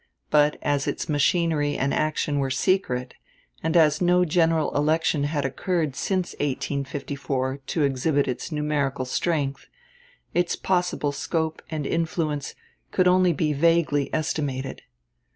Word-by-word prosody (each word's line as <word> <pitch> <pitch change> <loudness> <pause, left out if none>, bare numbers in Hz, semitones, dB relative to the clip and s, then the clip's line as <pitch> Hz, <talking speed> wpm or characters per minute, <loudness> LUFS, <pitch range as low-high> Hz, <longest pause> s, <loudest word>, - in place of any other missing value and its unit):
But 150 0 +4
as 145 -1 0
its - - -2
machinery 150 -1 +1
and 140 +1 0
action 150 -1 0
were 135 -1 0
secret, 130 -4 0 0.5
and 160 +2 +1
as 155 -1 +4
no 180 0 +4
general 165 -1 +2
election 155 0 +2
had 145 -1 -1
occurred 155 +1 -1
since 185 +4 -1
1854 140 -1 -2
to 160 - 0
exhibit 140 +1 +1
its 125 +6 -4
numerical 145 -3 -1
strength, 140 0 -1 0.7
its 175 0 +1
possible 180 -5 0
scope 160 +2 -2
and 155 -3 -3
influence 155 -3 -2 0.3
could 185 -1 +2
only 180 0 +4
be 155 -1 0
vaguely 150 -2 +2
estimated. 140 -4 -2
150 Hz, 125 wpm, -25 LUFS, 140-165 Hz, 0.7 s, But